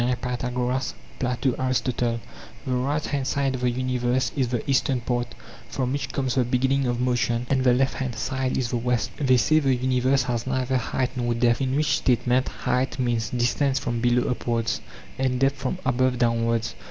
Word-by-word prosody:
Pythagoras, 125 +1 -2 0.2
Plato, 125 0 0
Aristotle: 125 -2 0 0.5
The 130 - -1
right 140 +4 0
hand 140 -2 -2
side 140 -2 0
of 130 - -4
the 125 - +2
universe 125 0 0
is 130 -3 +1
the 120 -2 -3
eastern 135 -1 +2
part 120 0 -2 0.3
from 130 -2 -2
which 140 - -2
comes 130 -3 -1
the 130 - +2
beginning 130 +2 +1
of 120 0 -1
motion, 120 -1 0
and 135 -1 +2
the 125 -1 +5
left 135 +1 +2
hand 130 -3 -3
side 130 -1 -1
is 125 -3 -1
the 120 - 0
west. 120 -1 0
They 130 -4 +3
say 155 +5 +4
the 135 -3 +2
universe 130 +1 +2
has 120 -1 -2
neither 130 0 0
height 125 +1 -1
nor 120 -2 0
depth, 120 +1 +2
in 130 0 0
which 145 -1 +2
statement 125 0 +2
height 130 +1 -1
means 120 -3 0
distance 130 +3 +1
from 120 -3 -2
below 120 0 +2
upwards, 115 -2 -1 0.4
and 130 -1 +1
depth 135 +1 +2
from 135 +6 -2
above 130 0 +2
downwards. 115 -1 +1
125 Hz, 185 wpm, -25 LUFS, 120-130 Hz, 0.5 s, the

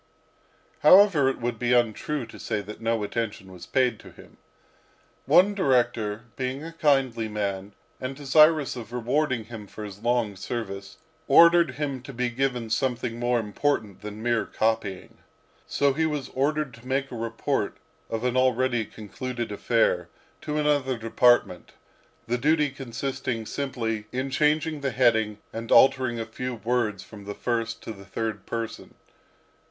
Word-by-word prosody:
However, 185 -8 +6
it 135 - -3
would 120 -2 -3
be 125 0 +1
untrue 120 +4 +1
to 115 - -13
say 110 -2 -2
that 105 +2 -10
no 115 -1 0
attention 105 -3 -4
was 90 -2 -11
paid 125 -4 +1
to - - -13
him. - - -17 0.9
One 195 +3 +6
director 120 - +1
being 130 +2 -3
a 165 +1 -8
kindly 135 -8 +2
man, 100 -2 -3 0.3
and 130 +1 -4
desirous 150 +1 +4
of 115 -3 -8
rewarding 125 +1 0
him 110 -2 -9
for 110 - -9
his 100 -1 -8
long 120 -3 +1
service, 100 -1 -6 0.3
ordered 170 0 +6
him 140 -3 -3
to 135 +2 -10
be 125 0 -1
given 125 -3 -1
something 120 -1 -1
more 120 0 +1
important 110 -1 -1
than 105 +1 -7
mere 120 -2 +1
copying. 110 -4 -2 0.5
So 140 -1 +2
he 160 +3 +1
was 150 -4 -3
ordered 145 0 -1
to 115 +2 -14
make 135 +1 -1
a - - -6
report 115 0 -2 0.3
of 115 +1 -3
an 125 0 0
already 130 -2 +2
concluded 120 +3 -6
affair, 100 -5 +1 0.3
to 150 0 -3
another 145 -4 +1
department; 115 -4 +2 0.5
the 120 +1 -1
duty 150 +1 +2
consisting 130 -3 -4
simply 115 -5 -3
in 130 +2 -3
changing 150 +2 +1
the 140 - 0
heading 110 -4 +2 0.2
and 115 0 -6
altering 130 -3 +5
a 115 - -3
few 125 +3 -5
words 115 -4 -1
from 105 -2 -12
the 100 0 -6
first 115 -1 -2
to - - -6
the 100 -2 -10
third 110 +1 -4
person. 115 -1 -5
120 Hz, 155 wpm, -26 LUFS, 110-135 Hz, 0.9 s, However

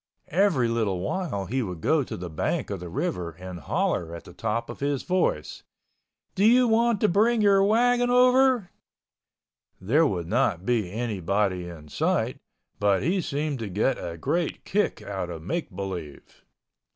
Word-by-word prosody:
Every 170 -9 +3
little 110 -5 0
while 100 - -2
he 130 +6 -1
would 90 -7 -5
go 155 - +2
to - - -6
the 90 0 -6
bank 80 +5 -2
of 100 - -3
the 90 0 -7
river 85 0 -3
and 90 +1 -8
holler 85 +2 -1
at 85 - -9
the - - -13
top 115 +3 -2
of - - -8
his 140 -1 -1
voice, 180 - -1 0.7
"Do 195 - 0
you 245 +3 +6
want 230 -1 +3
to 215 - +4
bring 220 +5 +3
your 195 -1 +5
wagon 245 +4 +3
over?" 250 -4 +4 1.1
There 145 +12 +3
would 90 -8 -2
not 95 -3 0
be 110 -7 0
anybody 100 -4 -1
in 75 -3 -11
sight, - - 0 0.4
but 100 -2 +2
he 185 +3 +1
seemed 145 -2 -2
to 110 -3 -4
get 105 +8 0
a 85 -1 -5
great 170 - -2
kick 210 +2 0
out 95 -3 -4
of 80 -2 -7
make 165 - -3
believe. 90 -7 -7
115 Hz, 165 wpm, -26 LUFS, -, 1.1 s, you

